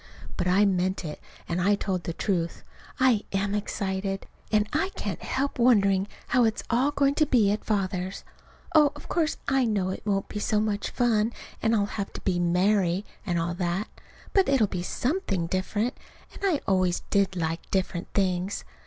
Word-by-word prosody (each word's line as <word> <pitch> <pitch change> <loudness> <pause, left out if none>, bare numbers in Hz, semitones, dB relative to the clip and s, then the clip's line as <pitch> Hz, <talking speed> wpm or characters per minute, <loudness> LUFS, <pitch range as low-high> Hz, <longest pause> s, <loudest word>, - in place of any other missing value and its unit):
But 180 - -1
I 190 +3 +5
meant 185 -1 0
it, 150 - -6 0.3
and 175 +1 -1
I 200 +3 +4
told 190 -3 -2
the 170 - -2
truth. 170 -3 -1 0.4
I 255 -5 +4
am 195 +1 0
excited. 195 -1 -2 0.3
And 210 -1 +3
I 325 +6 +1
can't - - -4
help 275 0 -2
wondering 200 -5 +4 0.2
how 250 - +4
it's 220 -1 +1
all 250 +4 +3
going 280 -1 +2
to 305 +1 +2
be 220 -7 +4
at 210 - -2
Father's. 190 -3 -2 0.5
Oh, 300 -2 +6
of - - -11
course, 325 -3 0
I 270 -2 +3
know 200 -5 0
it 190 - -4
won't 195 -2 0
be 210 - -5
so 210 0 +1
much 210 -1 -1
fun, 230 -2 +1 0.3
and 225 0 +3
I'll 205 -2 +2
have 200 -1 -4
to - - -7
be 180 -2 0
"Mary," 180 +2 +2 0.2
and 175 -2 +1
all 170 +1 -1
that; 180 +3 -2 0.4
but 390 -5 +4
it'll 270 -5 +4
be 185 -3 -3
something 230 - -1
different, 205 +7 -1 0.4
and - - -12
I 360 -7 +2
always 185 -2 +2
did 195 -1 +2
like 165 -1 -3
different 185 -2 -1
things. 185 0 0
200 Hz, 180 wpm, -27 LUFS, 185-230 Hz, 0.5 s, Oh